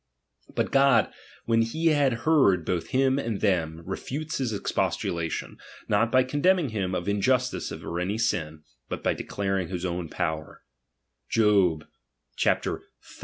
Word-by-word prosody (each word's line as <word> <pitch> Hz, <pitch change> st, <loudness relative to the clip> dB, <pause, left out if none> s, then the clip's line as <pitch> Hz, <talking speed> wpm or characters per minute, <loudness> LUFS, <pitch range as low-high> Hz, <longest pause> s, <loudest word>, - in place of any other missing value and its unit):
But -, -, 0 dB
God, 135 Hz, 0 st, +4 dB, 0.3 s
when 115 Hz, 0 st, +3 dB
he 160 Hz, +9 st, +1 dB
had 135 Hz, -6 st, +1 dB
heard 115 Hz, -, +4 dB
bott* 85 Hz, -2 st, -1 dB
him 130 Hz, +3 st, +2 dB
and 115 Hz, -6 st, -2 dB
thera, 85 Hz, -5 st, 0 dB
refutes 145 Hz, -, -4 dB
his 130 Hz, -4 st, -1 dB
expostulation, 85 Hz, -4 st, -2 dB, 0.3 s
not 115 Hz, +3 st, +2 dB
by^ 130 Hz, 0 st, +4 dB
condemning 160 Hz, +3 st, +2 dB
him 95 Hz, -4 st, -2 dB
of 85 Hz, -, -3 dB
injustice 125 Hz, +6 st, +1 dB
or -, -, -4 dB
auy 90 Hz, +6 st, -3 dB
sin, 80 Hz, -9 st, -1 dB, 0.3 s
but -, -, -5 dB
by^ -, -, +1 dB
declaring 95 Hz, -3 st, -2 dB
his 90 Hz, 0 st, -4 dB
own 85 Hz, -2 st, -3 dB
power, 80 Hz, -3 st, -4 dB, 0.7 s
(Jobxxxviii. 90 Hz, -, 0 dB
100 Hz, 130 wpm, -26 LUFS, 85-130 Hz, 0.7 s, God